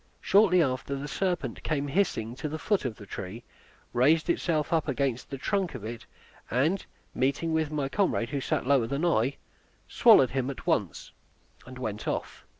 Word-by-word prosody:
Shortly 190 -3 +5
after 135 0 -2
the 140 +1 -5
serpent 180 +4 -2
came 145 -2 -1
hissing 135 - 0
to 150 - -4
the 155 - -4
foot 200 0 0
of 120 -4 -2
the 105 - -12
tree; 100 +4 -7 0.5
raised 150 +6 +3
itself 155 -2 0
up 160 -2 +1
against 130 -3 -1
the 135 - -5
trunk 190 +2 -1
of 110 -4 -7
it, 115 +1 -7 0.4
and 155 +11 +1 0.3
meeting 140 +5 0
with 160 -2 +1
my 150 -3 -1
comrade, 140 - 0
who 140 -2 -2
sat - - -1
lower 130 -4 +3
than 140 +6 -1
I, 135 -5 +1 0.5
swallowed 130 - +6
him 130 0 -1
at 140 - -7
once, 105 - -1 0.6
and 130 0 -9
went 110 -4 -5
off. - - -4
140 Hz, 175 wpm, -28 LUFS, 125-160 Hz, 0.6 s, swallowed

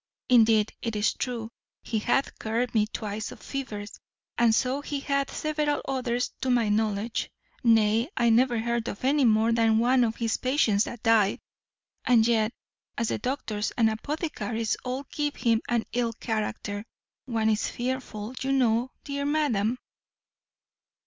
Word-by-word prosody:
Indeed, 225 -3 +5
it 230 -2 -3
is 210 +1 +2
true, 235 -3 -4 0.3
he 220 - -1
hath 245 +5 0
cured 230 +3 -1
me 215 -2 +3
twice 215 -1 -5
of - - -11
fevers, 215 -7 -6 0.4
and 230 -2 +4
so 260 +3 0
he 285 -1 -4
hath 280 -1 0
several 300 -1 -1
others 250 -2 -1
to 260 - -1
my 240 -4 +3
knowledge; 215 +1 0 0.3
nay, 225 +2 +4
I 235 -2 +4
never 240 +1 +3
heard 235 0 -1
of 200 - -5
any 280 0 +3
more 220 0 +4
than 225 -1 +3
one 250 +2 +4
of 225 -1 0
his 230 -1 -1
patients 240 -6 +2
that 240 - -8
died; 225 -4 +3 0.6
and 235 -3 +4
yet, 225 -1 +2 0.5
as 230 -2 0
the - - -1
doctors 220 -5 -2
and 225 -2 +4
apothecaries 225 - -2
all 260 +2 -3
give 295 -1 -1
him 230 -2 +2
an 235 -2 +1
ill 235 -1 0
character, 215 -2 -3 0.4
one 225 -3 0
is 215 - 0
fearful, 245 -3 -4
you 270 +1 0
know, 245 -1 +2
dear 280 -1 -3
madam." 255 -7 +1
235 Hz, 155 wpm, -27 LUFS, 220-255 Hz, 0.6 s, Indeed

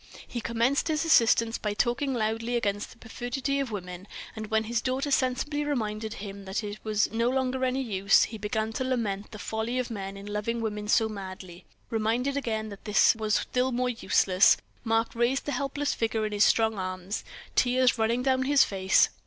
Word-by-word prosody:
He 240 - -4
commenced 235 +5 +1
his 310 0 0
assistance 230 -6 +4
by 210 -1 -2
talking 245 +5 0
loudly 230 0 -1
against 205 -3 -1
the - - -15
perfidy 255 +4 -3
of 275 -3 -1
women; 180 -2 -7 0.3
and 215 -1 -5
when 220 +1 +1
his 225 +1 -1
daughter 265 +3 -1
sensibly 275 +3 +1
reminded 220 -6 -2
him 200 -1 -8
that 190 +2 -5
that 210 -1 -4
was 215 -1 +1
no 230 +2 +1
longer 260 0 0
any 260 +1 0
use, 200 -4 +3
he 220 -1 -5
began 220 +1 -2
to 260 - -2
lament 220 -6 -2
the 215 - -9
folly 220 +4 -3
of 255 -1 -2
men 195 -2 -5
in 200 - -9
loving 210 +3 -2
women 210 -2 -3
so 220 +1 +3
madly; 185 -4 -8 0.3
reminded 230 +5 0
again 220 -5 -2
that 200 -1 -11
this 210 +2 +5
was 215 -1 0
still 255 +1 0
more 250 +1 0
useless, 190 -5 +4 0.3
Mark 225 0 +1
raised 240 +3 +1
the 290 - -2
helpless 280 +2 -1
figure 225 -1 -1
in 215 - -3
his 205 0 +4
strong 220 -2 +2
arms, 185 +2 -4 0.3
tears 250 -1 +3
running 230 +3 +1
down 260 -1 +2
his 285 0 +5
face. 190 -1 +3
225 Hz, 190 wpm, -28 LUFS, 210-255 Hz, 0.3 s, this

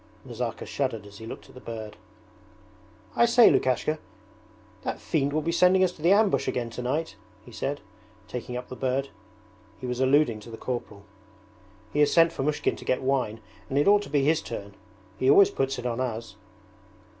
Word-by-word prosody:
Nazarka 120 -2 -4
shuddered 120 -7 -2
as 100 -1 -13
he 110 - -8
looked - - -9
at - - -17
the 130 - -12
bird. 110 -2 -7 1.2
'I 235 - +5
say, 235 0 +7
Lukashka, 140 +4 +1 0.8
that - - -4
fiend 145 -2 0
will 155 +1 -1
be 170 - 0
sending 180 +2 +4
us 185 - +2
to 170 - -16
the 170 +4 +4
ambush 205 0 +3
again 120 -2 -2
tonight,' 130 +7 -3 0.3
he - - -13
said, - - -3 0.5
taking 125 0 -5
up 125 - -7
the 130 - -6
bird. 135 +1 -1 0.7
(He - - -7
was 125 0 -3
alluding 130 -3 +3
to 105 - -12
the 115 - -8
corporal.) 110 -6 -5 0.9
'He 150 - 0
has 150 - +4
sent 165 -1 +5
Fomushkin 150 +1 -1
to - - -11
get 130 - 0
wine, 125 -5 0 0.3
and 135 - -1
it 145 - +3
ought 205 0 +6
to 205 - -9
be 145 -1 +2
his 155 +3 +3
turn. 100 -3 -7 0.5
He 130 - +3
always 195 +8 +7
puts 135 0 -1
it 125 - -6
on 120 0 -2
us.' 115 -4 -4
130 Hz, 190 wpm, -26 LUFS, 120-155 Hz, 1.2 s, say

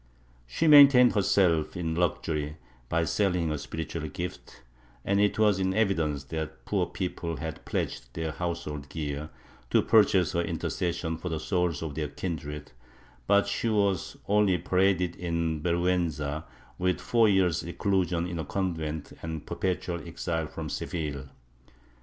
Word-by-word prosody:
She 160 - -1
maintained 140 -5 +8
herself 95 -5 +2
in 80 -2 -2
luxury 80 -3 -1 0.3
by 85 0 +1
selling 90 -4 +1
her 75 - -1
spiritual 80 +1 -5
gifts, 85 -3 -7 0.4
and 100 +1 +2
it 105 - +2
was 105 -3 +3
in 95 0 0
evidence 80 -10 +1
that 80 0 -5
poor 95 -4 0
people 90 -2 -4
had 80 -2 -6
pledged - - -3
their 80 -1 -2
household 75 -4 -4
gear 75 -1 -4 0.4
to - - +3
purchase 100 -5 +4
her 85 - +1
intercession 85 -1 -2
for 90 +2 -5
the 80 -1 -2
souls 85 -1 0
of 80 -3 -4
their 75 0 -2
kindred, 75 -2 -5 0.6
but 100 0 +5
she 100 +3 -1
was 100 -4 0
only 100 -3 +3
paraded 90 0 +1
in 85 -3 -1
vergiienza 85 -3 0 0.3
with 90 0 +1
four 115 -2 +3
year's 90 -4 +2
reclusion 90 -1 0
in 85 -1 -4
a - - -2
convent 80 -3 -3
and 80 -2 -5
perpetual 90 -2 -2
exile 80 -2 -2
from - - -6
Seville. 70 -5 -4
85 Hz, 140 wpm, -28 LUFS, 80-95 Hz, 0.6 s, maintained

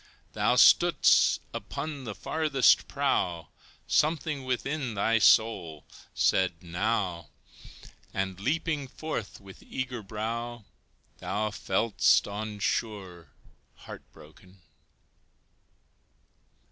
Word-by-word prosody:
Thou - - +1
stood'st - - +5
upon 145 -4 -6
the 105 -3 -6
farthest 150 +1 +2
prow, 85 -3 -1 0.4
Something 150 -3 0
within 130 -1 -3
thy 115 +3 +2
soul 95 -8 +3 0.3
said 90 -2 +1
"Now!" 90 0 -2 0.8
And 95 -1 -3
leaping 150 +4 -1
forth 130 -6 -6
with 95 -2 -14
eager 125 -2 -5
brow, 115 +2 -5 0.5
Thou 105 +1 -2
fell'st 105 +2 +2
on 105 +1 -5
shore 95 -3 -3 0.5
heart - - -11
broken. 90 +4 -18
110 Hz, 85 wpm, -28 LUFS, 95-130 Hz, 0.8 s, stood'st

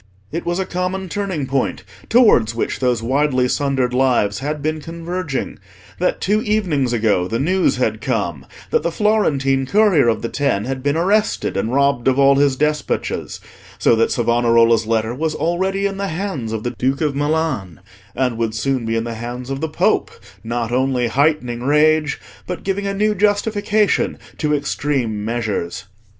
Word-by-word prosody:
It 170 +2 -4
was 175 0 0
a 190 - -1
common 185 +1 -3
turning 190 -7 -2
point 135 0 -1 0.3
towards 165 - +4
which 115 - -2
those 125 -3 0
widely 130 0 +1
sundered 130 -2 0
lives 125 -6 +2
had 150 +2 -3
been 155 +2 -2
converging, 165 -5 -4 0.4
that 180 - 0
two 210 +3 +1
evenings 180 - 0
ago 105 -6 +1
the 115 - -2
news 180 +8 +2
had - - -1
come - - -2 0.2
that 470 - +3
the - - -1
Florentine 140 - +1
courier 200 - +4
of 110 -2 0
the - - 0
Ten 115 -7 -1
had 130 0 -3
been 145 +3 0
arrested 200 - +1
and 105 +4 -1
robbed 140 -2 +2
of 130 0 +3
all 140 0 +5
his 140 -1 +3
despatches, 150 +1 -2 0.4
so - - +3
that 115 - +2
Savonarola's 115 -1 +3
letter 110 0 0
was 155 +4 -2
already 190 +5 0
in 195 -1 -2
the 200 0 -2
hands 160 - -4
of 110 -1 -3
the 120 - -2
Duke 130 +4 -1
of 150 -3 0
Milan, 145 - -1 0.4
and 125 -3 -1
would 115 -1 -1
soon 130 +1 -1
be 115 - 0
in 115 - 0
the 115 0 -4
hands 120 +3 -6
of 135 +1 -4
the 160 - -1
Pope, 155 - +1 0.3
not 115 0 -3
only 125 -1 +1
heightening 130 -3 +1
rage, 150 +2 +2 0.3
but 180 - -5
giving 200 +1 -2
a 195 - -2
new 210 +1 +2
justification 210 +1 +1 0.2
to 150 -1 +1
extreme 135 -7 -2
measures. 110 -6 -3
140 Hz, 170 wpm, -19 LUFS, 120-175 Hz, 0.4 s, all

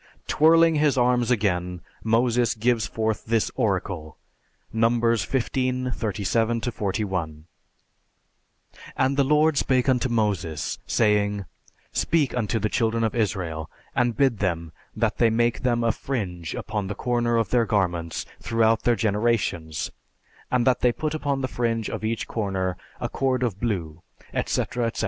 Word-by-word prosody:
Twirling 165 +1 +5
his 145 -2 +2
arms 125 -1 +3
again, 90 -6 0 0.2
Moses 120 +1 +2
gives 115 -1 +1
forth 110 0 -2
this 115 -1 +1
oracle 95 - -2 0.6
(Numbers 115 -2 +2
XV, 130 0 -1
37 110 +2 0
41): 95 -9 -3 1.5
"And 130 +1 +2
the 140 - +3
Lord 150 +2 +3
spake 130 -1 +2
unto 130 0 +2
Moses, 95 -9 -1
saying, 105 -2 +2 0.5
'Speak 155 -5 +1
unto 115 -2 0
the 110 0 0
Children 115 +1 0
of 110 - 0
Israel, 90 -8 -2 0.3
and 120 -2 +1
bid 130 -7 +2
them 85 -4 -1 0.2
that - - 0
they 115 - +5
make 120 +1 +1
them 120 -2 +1
a 115 - +3
fringe 90 - -4
upon 105 -2 -3
the 100 - -4
corner 120 0 0
of 115 -4 0
their 120 -2 +3
garments 85 -5 -1
throughout 115 -1 +2
their 120 - +3
generations, 105 -8 0 0.6
and 125 -2 +2
that 130 -2 +3
they 125 - +3
put 155 +4 -3
upon 145 -3 -1
the 130 - 0
fringe 115 -3 -1
of - - -5
each 110 +1 -2
corner 95 -4 -2 0.2
a - - -2
cord 130 -2 0
of 105 -6 -1
blue, 85 -9 -3 0.3
etc., 120 -1 -1
etc." 115 - -4
115 Hz, 145 wpm, -25 LUFS, 100-125 Hz, 1.5 s, Twirling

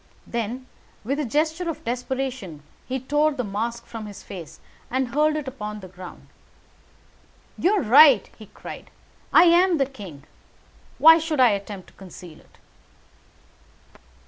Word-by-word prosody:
Then, 235 +2 -4 0.4
with 275 +7 -2
a 300 - -1
gesture 315 +7 -1
of 325 - -6
desperation, 245 - -4 0.2
he 265 +1 -2
tore 295 +4 +1
the 255 -3 -3
mask 230 +3 -4
from 225 -2 -8
his 205 - -11
face 175 -6 -10 0.3
and 260 0 -1
hurled 300 +4 +2
it 300 -3 -4
upon 210 -5 -6
the 190 - -10
ground. 180 0 -12 1.3
"You 370 +5 +2
are 405 - +1
right," 265 0 +7
he 215 - -13
cried, - - -11 0.4
"I - - +7
am 350 0 +4
the 275 - +2
king. 200 - -11 0.7
Why 325 +1 +8
should 315 -3 -3
I 250 -2 +7
attempt 200 -2 -5
to - - -25
conceal 180 -3 -13
it?" - - -24
255 Hz, 145 wpm, -23 LUFS, 205-300 Hz, 1.3 s, Why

